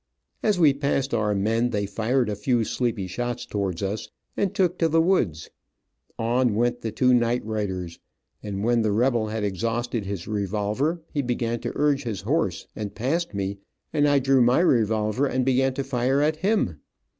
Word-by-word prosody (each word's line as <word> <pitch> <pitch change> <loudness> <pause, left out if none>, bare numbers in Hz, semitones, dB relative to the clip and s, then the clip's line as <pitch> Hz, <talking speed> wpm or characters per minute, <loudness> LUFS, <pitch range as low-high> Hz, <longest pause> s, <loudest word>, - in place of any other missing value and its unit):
As 210 -3 +2
we 155 -5 +5
passed 140 -1 -1
our 105 -2 +1
men 115 +5 +1
they 105 -3 -1
fired 115 +5 0
a 105 - -2
few 115 +3 +1
sleepy 110 -4 -1
shots 120 +6 -4
towards 100 -5 -3
us, 100 +2 -3 0.3
and 195 - 0
took 180 -2 0
to 165 - +3
the 165 +1 +3
woods. 120 - +1 0.7
On 120 0 +1
went 120 +2 0
the 110 - -3
two 125 +3 +3
night 120 -1 +2
riders, 95 -6 -3 0.4
and 100 -1 -4
when 120 +1 +3
the 110 -1 +1
rebel 115 +1 +2
had 110 0 -3
exhausted 115 +3 -2
his 95 -4 -5
revolver 105 - -1
he 145 - 0
began 120 -2 -1
to - - -4
urge 145 -1 +2
his 115 -7 -4
horse, 110 - -1
and 105 -2 -5
passed 160 +3 -1
me, 100 0 -3 0.3
and 145 0 +3
I 145 -1 +4
drew 135 -1 +3
my 120 +6 +4
revolver 110 - +2
and 130 -1 0
began 130 0 +2
to 140 - -1
fire 130 +1 +1
at 150 +2 +2
him. 185 - 0
120 Hz, 180 wpm, -25 LUFS, 105-135 Hz, 0.7 s, we